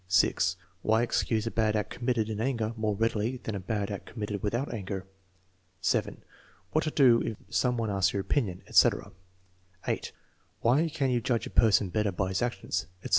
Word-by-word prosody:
(6) 90 -1 +3 0.3
Why 110 +2 +3
excuse 110 -2 0
a 115 - -2
bad 110 -1 +1
act 105 -2 -1
committed 120 -3 0
in 110 -1 -3
anger 115 -3 -1
more 110 -2 -1
readily 115 +3 0
than 110 - -5
a 100 - -3
bad 100 +1 -2
act 100 - -6
committed 105 -3 -4
without 120 +6 -1
anger. 95 -3 -4 0.7
(7) - - 0 0.5
What 155 +1 +1
to - - +1
do 130 -6 +5
if 110 - -3 0.2
some 120 +8 +2
one 115 -2 -1
asks 100 -1 +2
your 100 - -1
opinion, 95 -5 -1
etc. - - +3 0.7
(8) - - -2 0.5
Why 145 +8 +3
can 145 -4 0
you 120 -1 +1
judge 120 -1 0
a - - -7
person 105 -3 +4
better 105 +1 0
by 95 +1 -1
his 95 - -1
actions, 120 -6 -2 0.2
etc. - - -5
110 Hz, 185 wpm, -29 LUFS, 100-120 Hz, 0.7 s, do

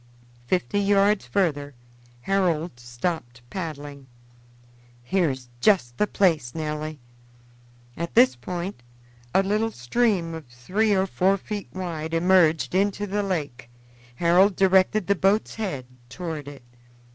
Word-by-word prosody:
Fifty 185 +4 0
yards 200 0 +3
further 145 -8 -1 0.5
Harold 170 -5 0
stopped 120 0 -4
paddling. 145 -6 -6 1.0
"Here 180 +4 +1
is 130 -2 -6
just 125 - +3
the 210 - +3
place, 160 -14 +1
Nelly." 155 -1 -4 1.0
At 170 -6 -5
this 130 0 +6
point 175 +5 -5 0.5
a 190 - +3
little 210 +3 +1
stream 180 - 0
of 160 -4 -8
three 190 - 0
or 190 0 +2
four 195 +1 +2
feet 205 +1 -6
wide 165 -3 -4
emerged 170 -2 +3
into 200 +2 +1
the 205 +1 -1
lake; 145 - -4 0.5
Harold 180 +6 +4
directed 190 +2 +3
the 200 - +3
boat's 200 +3 +1
head 185 - -4 0.2
toward 160 -1 -6
it. 140 -3 -10
175 Hz, 120 wpm, -25 LUFS, 145-195 Hz, 1.0 s, this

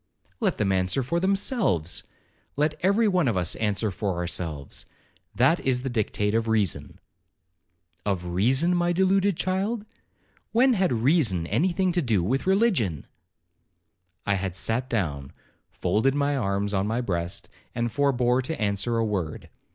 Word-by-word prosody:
'Let - - 0
them 100 -2 +1
answer 95 +7 +1
for 170 +7 -1
themselves—let 170 - -1
every 200 +5 +3
one 180 -7 +2
of 110 -5 +1
us 90 -2 0
answer 105 -1 0
for 95 0 -2
ourselves—that 85 - -2
is 125 -1 0
the 135 - -3
dictate 105 -2 0
of 115 0 +1
reason.' 100 -10 0 1.1
'Of 95 -4 -2
reason, 130 - +2
my 175 0 +1
deluded 190 0 +2
child,—when 220 +5 -2
had 190 - +1
reason 120 - +2
any 140 - +1
thing 185 +1 +1
to 175 0 +1
do 110 - +1
with 130 - -1
religion?' 190 - +2 1.2
I 100 - +2
had 95 -2 -3
sat 115 +7 0
down, 75 - -2 0.4
folded 110 +9 0
my 145 0 +1
arms 100 -4 -1
on 95 +1 0
my 115 +3 -1
breast, 85 -6 -3 0.3
and 120 0 -1
forbore 125 -2 +2
to 155 +5 -5
answer 105 +2 0
a 115 - +1
word. 95 -8 -3
120 Hz, 140 wpm, -25 LUFS, -, 1.2 s, every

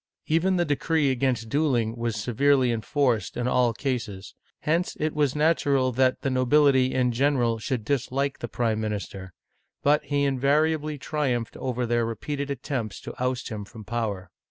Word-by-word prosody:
Even 170 +4 +2
the 175 -1 +2
decree 150 -1 +1
against 125 -3 0
dueling 120 -4 +1
was 115 -2 -2
severely 125 +4 +2
enforced 115 +2 0
in 120 0 -1
all 125 -1 +3
cases; 115 -6 -4 0.3
hence 165 +4 0
it 155 0 0
was 145 -3 +1
natural 145 -4 +2
that 130 +1 +2
the 135 - -1
nobility, 130 0 +4
in 125 -1 +1
gen 140 +4 +2
eral, 115 -2 0
should 120 -3 -2
dislike 140 +1 -1
the 120 - -4
prime 110 -1 -1
minister; 100 -3 -5 0.5
but 150 +1 +3
he 145 -1 0
invariably 150 +3 +1
triumphed 135 -5 -2
over 125 -1 -2
their 120 0 +1
repeated 140 +6 -3
attempts 130 -7 -3
to - - -8
oust 125 -1 -1
him 105 -2 -5
from 110 +2 -11
power. 105 -5 -3
130 Hz, 160 wpm, -26 LUFS, 115-145 Hz, 0.5 s, nobility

